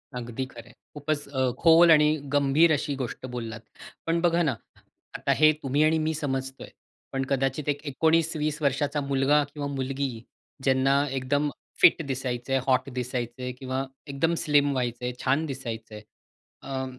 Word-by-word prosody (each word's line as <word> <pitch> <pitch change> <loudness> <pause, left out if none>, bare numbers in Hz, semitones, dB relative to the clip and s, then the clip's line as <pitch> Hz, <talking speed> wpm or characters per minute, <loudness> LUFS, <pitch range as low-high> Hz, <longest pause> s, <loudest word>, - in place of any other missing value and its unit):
अगदी 120 +1 -4
खरंय. 120 -2 -13 0.2
खूपच 145 0 -3
अ, 130 -2 0
खोल 165 0 +7
आणि 150 -1 +5 0.2
गंभीर 145 +4 +4
अशी 145 -1 -1
गोष्ट 130 -1 -5
बोललात. 115 -2 -6 0.4
पण 165 +1 +1
बघा 170 0 +3
ना, 140 -6 0 0.6
आता - - 0
हे 155 0 +6
तुम्ही 140 +2 +2
आणि 155 +1 +3
मी 155 +1 0
समजतोय, 135 -3 -4 0.4
पण 135 0 0
कदाचित 135 +2 0
एक 145 0 -1
19-20 155 +1 +1
वर्षाचा 145 +1 0
मुलगा 140 +1 +2
किंवा 145 -2 -4
मुलगी 135 -3 -3 0.4
ज्यांना 135 +1 +3 0.2
एकदम 140 +3 0 0.3
फिट 165 - +7
दिसायचं 130 -1 -3
आहे, 135 - +2
हॉट 130 0 +2
दिसायचं 125 0 -4
किंवा 130 0 -3 0.2
एकदम 145 +4 0
स्लिम 145 -1 +3
व्हायचंय, 125 -1 -2
छान 140 +5 +1
दिसायचंय. 115 -6 -6 0.6
अ, 135 -1 -3
135 Hz, 145 wpm, -26 LUFS, 130-150 Hz, 0.6 s, खोल